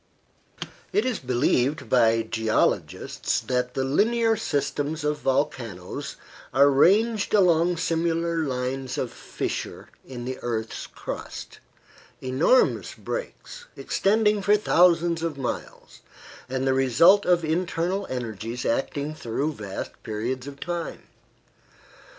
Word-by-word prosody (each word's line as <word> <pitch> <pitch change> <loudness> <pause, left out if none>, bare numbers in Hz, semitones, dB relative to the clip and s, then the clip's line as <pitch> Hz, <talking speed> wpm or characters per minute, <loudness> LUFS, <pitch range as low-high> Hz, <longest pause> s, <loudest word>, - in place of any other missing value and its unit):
It 210 - +1
is 255 -3 -1
believed 130 +3 +1
by 115 -2 +4
geologists 110 0 0
that 125 -1 -2
the 135 - 0
linear 225 - +2
systems 150 -4 -2
of 150 0 0
volcanoes 120 -9 -2 0.4
are 140 +1 +6
ranged 210 +10 +3
along 175 -3 +4
similar 165 0 0
lines 130 -2 -2
of 125 - -2
fissure - - -5
in 125 -2 -8
the 130 0 -4
earth's 110 -2 -3
crust - - -7 0.6
enormous 130 - +2
breaks, - - -6
extending 210 +1 +2
for 205 +2 +4
thousands 170 -4 +3
of 165 -4 -2
miles, 130 -3 -6 0.5
and 130 +1 -1
the 135 - +3
result 135 - +5
of 175 -2 +3
internal 175 +3 -1
energies 115 -1 -4
acting 140 +5 -1
through 145 +2 -2
vast 100 -6 -6
periods 120 +5 -4
of 140 0 -9
time. 175 0 -4
145 Hz, 110 wpm, -25 LUFS, 125-175 Hz, 0.6 s, are